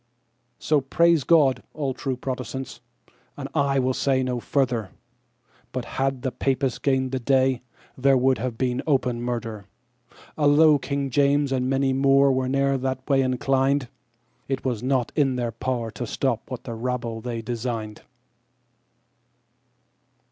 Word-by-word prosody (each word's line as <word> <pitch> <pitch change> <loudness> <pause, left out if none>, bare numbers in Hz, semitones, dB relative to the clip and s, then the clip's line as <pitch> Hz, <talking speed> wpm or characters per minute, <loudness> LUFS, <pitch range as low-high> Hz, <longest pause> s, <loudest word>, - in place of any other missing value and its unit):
So 150 -2 +1
praise 165 +3 +3
God, 135 -6 +4
all 140 -3 -2
true 130 0 -3
Protestants, 130 +1 -5 0.6
and - - -5
I 140 -1 +1
will 130 0 +1
say 130 0 +1
no 125 -1 -2
further, 120 -6 0 0.8
But 125 -2 -4
had 135 -1 -2
the 130 - -1
Papists 135 0 -1
gained 130 -2 +1
that 130 -2 -3
day, 130 -1 +2 0.3
there 135 +1 +3
would 130 +1 +2
have 120 -1 -3
been 125 0 0
open 125 -5 +1
murder. 115 -4 -4 0.7
Although 150 0 +5
King 140 -1 -3
James 140 +1 +2
and 130 -1 0
many 135 0 +1
more 135 +1 +4
were 130 -1 0
ne'er 135 0 +1
that 130 0 -3
way 135 -2 +3
inclined, 135 +1 +1 0.6
It 135 -1 -3
was 120 -5 -1
not 130 -1 0
in 135 -4 +2
their 120 -2 -2
power 115 0 -3
to 120 - -5
stop 120 -1 -2
what 125 -2 -6
the 120 - -6
rabble 115 -1 -3
they 115 -1 -4
designed. 115 -2 -4
130 Hz, 145 wpm, -24 LUFS, 125-135 Hz, 0.8 s, Although